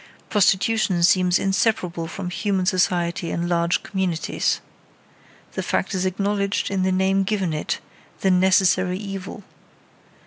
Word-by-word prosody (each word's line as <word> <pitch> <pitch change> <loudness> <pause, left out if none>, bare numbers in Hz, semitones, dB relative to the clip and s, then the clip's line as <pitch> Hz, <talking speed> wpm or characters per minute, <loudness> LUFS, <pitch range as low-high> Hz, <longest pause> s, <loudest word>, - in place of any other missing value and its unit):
Prostitution 195 -2 +2
seems 180 0 +4
inseparable 190 -4 0
from 180 +1 -6
human 195 -1 -1
society 175 -2 0
in 170 +1 -2
large 170 0 +1
communities. 185 -4 -1 0.9
The - - -4
fact - - -1
is 185 0 0
acknowledged 200 +1 -1
in 195 -1 0
the 185 0 +1
name 190 +1 +2
given 195 -4 -1
it, 155 - -2 0.4
"the 190 - +3
necessary 185 0 +3
evil." 195 0 -7
185 Hz, 125 wpm, -22 LUFS, 180-195 Hz, 0.9 s, seems